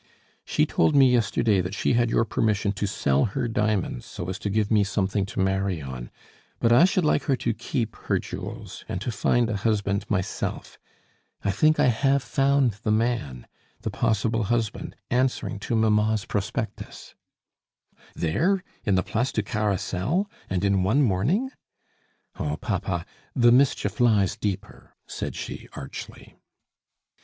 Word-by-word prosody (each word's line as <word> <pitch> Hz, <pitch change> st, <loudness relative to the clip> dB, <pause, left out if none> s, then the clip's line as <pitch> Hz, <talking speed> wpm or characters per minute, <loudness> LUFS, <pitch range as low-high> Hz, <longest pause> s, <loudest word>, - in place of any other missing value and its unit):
"She -, -, +1 dB
told 80 Hz, -, +2 dB
me 135 Hz, -2 st, +6 dB
yesterday 110 Hz, -3 st, +2 dB
that 90 Hz, +3 st, -4 dB
she -, -, +1 dB
had 120 Hz, 0 st, +2 dB
your 115 Hz, -, +2 dB
permission 105 Hz, -2 st, +1 dB
to 100 Hz, +1 st, -2 dB
sell 70 Hz, -6 st, +1 dB
her 120 Hz, +4 st, -2 dB
diamonds 105 Hz, -, -1 dB
so 85 Hz, -, -6 dB
as 95 Hz, +1 st, -4 dB
to 105 Hz, -, -3 dB
give 105 Hz, +1 st, 0 dB
me 105 Hz, -2 st, +5 dB
something 100 Hz, 0 st, -1 dB
to -, -, -6 dB
marry 95 Hz, -2 st, 0 dB
on; 65 Hz, -4 st, -7 dB, 0.5 s
but 115 Hz, -, +2 dB
I 120 Hz, +8 st, +7 dB
should 185 Hz, -2 st, +1 dB
like 145 Hz, -2 st, +2 dB
her 135 Hz, -, +2 dB
to 115 Hz, -2 st, -1 dB
keep 115 Hz, -1 st, -3 dB
her -, -, -1 dB
jewels, -, -, -7 dB
and -, -, -2 dB
to 120 Hz, +5 st, -3 dB
find 115 Hz, +3 st, +2 dB
a 110 Hz, -3 st, -1 dB
husband 100 Hz, -1 st, 0 dB
myself. 95 Hz, -3 st, -3 dB, 0.6 s
I 100 Hz, -, +1 dB
think 155 Hz, +10 st, +3 dB
I -, -, +5 dB
have 135 Hz, +3 st, +2 dB
found 135 Hz, -4 st, +2 dB
the -, -, -2 dB
man, 110 Hz, -, 0 dB, 0.4 s
the -, -, -3 dB
possible 110 Hz, +1 st, 0 dB
husband, 115 Hz, -1 st, -2 dB, 0.2 s
answering 125 Hz, -5 st, 0 dB
to 115 Hz, -, -2 dB
mamma's 110 Hz, -1 st, +2 dB
prospectus 105 Hz, +3 st, -4 dB, 0.5 s
" -, -, -31 dB
"There? 180 Hz, -, +1 dB, 0.2 s
in 100 Hz, -4 st, +2 dB
the 90 Hz, -, +2 dB
Place 125 Hz, +4 st, -1 dB
du 110 Hz, -, -1 dB
Carrousel? 105 Hz, -, -1 dB, 0.2 s
and 95 Hz, +1 st, 0 dB
in 100 Hz, -1 st, +3 dB
one 110 Hz, +10 st, +3 dB
morning?" 135 Hz, -, +1 dB, 0.9 s
"Oh, 75 Hz, 0 st, -2 dB
papa, 85 Hz, +2 st, -2 dB, 0.3 s
the 120 Hz, -2 st, +5 dB
mischief 130 Hz, +2 st, +2 dB
lies 110 Hz, -6 st, +3 dB
deeper!" 100 Hz, 0 st, -5 dB
said -, -, -5 dB
she -, -, -7 dB
archly. 65 Hz, -, -9 dB
110 Hz, 155 wpm, -25 LUFS, 95-120 Hz, 0.9 s, I